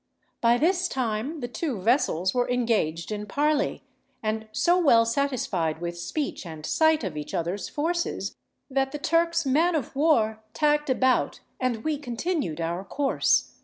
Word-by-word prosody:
By 235 +1 +4
this 360 +5 +2
time 255 +4 -2
the 245 - -2
two 250 - -3
vessels 190 - +2
were 245 0 +1
engaged 220 -9 0
in 210 0 -4
parley, 295 +5 0 0.4
and 220 0 -2
so 340 +11 +3
well 235 -9 +5
satisfied 230 - -1
with 170 0 -4
speech 280 - -3
and 160 -3 -8
sight 315 - +3
of 185 -6 -3
each 150 0 -5
other's 175 +4 -2
forces, 340 +3 -2 0.3
that 270 0 0
the - - -2
Turks' 335 +2 +1
man 320 +6 +3
of 280 -3 -3
war 225 -8 +2
tacked 295 -1 +2
about 260 0 +2 0.2
and 245 -4 -1
we 310 -2 -1
continued 250 - -2
our 170 +3 -2
course. 275 +8 +1
250 Hz, 155 wpm, -26 LUFS, 210-300 Hz, 0.4 s, well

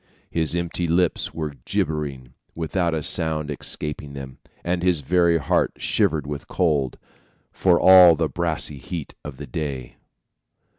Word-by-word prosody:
His 80 0 0
empty 85 0 -1
lips 85 0 +1
were 75 -3 -4
gibbering 70 -5 -3 0.2
without 85 +1 -1
a 80 - -2
sound 75 -1 -1
escaping 75 0 -5
them, 65 -2 -8 0.2
and 90 0 -1
his 90 -4 +2
very 85 +3 +3
heart 70 - +1
shivered 75 -2 0
with 70 0 -6
cold, 75 -8 0 0.5
for 90 -2 +3
all 90 -3 +8
the 80 0 0
brassy 80 -2 -2
heat 75 +4 -6
of 70 -4 -8
the 75 - -7
day. 70 -2 -5
80 Hz, 140 wpm, -23 LUFS, 70-85 Hz, 0.5 s, all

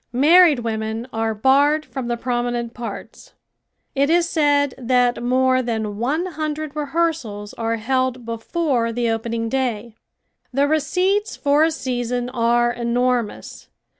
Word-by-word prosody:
Married 310 +4 +6
women 220 0 -3
are 225 0 -1
barred 285 +7 +3
from 265 -3 -6
the 240 0 -1
prominent 240 -1 -2
parts. 230 -4 -8 0.6
It 280 +1 +1
is 340 +1 +3
said 290 -4 +2
that 245 -1 +1
more 255 +1 +2
than 220 -4 -3
one 295 +9 0
hundred 310 -3 -4
rehearsals 290 -9 -2
are 230 0 -2
held 255 +1 -1
before 230 +1 -1
the 235 0 0
opening 230 0 -2
day. 235 -3 -2 0.6
The 275 +3 +2
receipts 365 +8 0
for 290 +1 +2
a 325 - +4
season 245 -4 -3
are 240 -1 +2
enormous. 240 -1 -2
250 Hz, 130 wpm, -21 LUFS, 230-290 Hz, 0.6 s, Married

